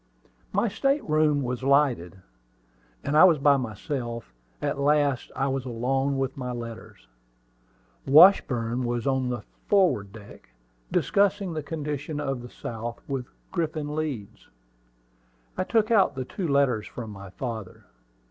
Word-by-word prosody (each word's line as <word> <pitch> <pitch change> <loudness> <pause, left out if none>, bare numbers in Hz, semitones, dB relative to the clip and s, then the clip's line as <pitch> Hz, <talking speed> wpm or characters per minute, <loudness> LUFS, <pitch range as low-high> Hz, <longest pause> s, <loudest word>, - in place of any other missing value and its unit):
My 205 +4 +1
state 275 +7 0
room 155 -2 +2
was 125 0 -3
lighted, 130 - +1 0.8
and 145 - -1
I 155 - +8
was 175 -4 +7
by 140 0 +4
myself. 120 - -5 0.3
At - - -2
last 145 -2 +1
I 135 - 0
was 135 -1 -1
alone 135 +3 -1
with 135 -1 -2
my 125 -2 -4
letters. 115 - -8 1.0
Washburn 130 -7 +5
was 120 -1 -2
on 130 -2 +1
the 120 -4 -4 0.2
forward 180 - +3
deck, 100 - -13 0.4
discussing 200 -2 +1
the 155 - -3
condition 150 -1 -4
of 135 -4 -2
the 120 - -9
South 115 0 -6
with 135 -3 -3 0.2
Griffin 155 -4 -2
Leeds. 140 -10 -5 1.1
I - - 0
took 220 +1 +1
out 210 -9 +4
the 130 -1 -4
two 180 - -4
letters 140 -6 +2
from 115 -3 -7
my 100 -1 -10
father. 110 -2 -6
135 Hz, 140 wpm, -26 LUFS, 120-150 Hz, 1.1 s, I